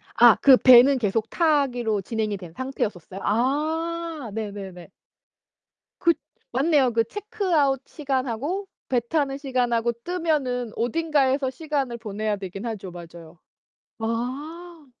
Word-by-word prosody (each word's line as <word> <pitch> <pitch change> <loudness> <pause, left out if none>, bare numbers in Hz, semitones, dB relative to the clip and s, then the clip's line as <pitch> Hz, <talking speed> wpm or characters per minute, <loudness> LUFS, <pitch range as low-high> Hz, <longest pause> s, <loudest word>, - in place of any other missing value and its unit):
아 240 -2 +8
그 265 -2 +8
배는 255 +2 +7
계속 220 0 -1
타기로 255 - +1
진행이 215 0 -2
된 175 -3 -11
상태였었어요? 205 - -4
아 310 +5 -1
네네네. 200 -5 -6 1.1
그 340 -1 +4 0.4
맞네요. 275 0 +3
그 230 0 +3
체크아웃 330 - 0
시간하고 275 - -2 0.2
배 250 - +3
타는 275 +2 -1
시간하고 245 -4 0
뜨면은 295 -9 -1
어딘가에서 270 +1 +1
시간을 270 -3 -3
보내야 215 -1 -3
되긴 195 +3 -7
하죠. 205 -5 -5
맞아요. 170 -1 -12 0.6
아. 285 +9 -5
255 Hz, 260 characters per minute, -24 LUFS, 220-300 Hz, 1.1 s, 아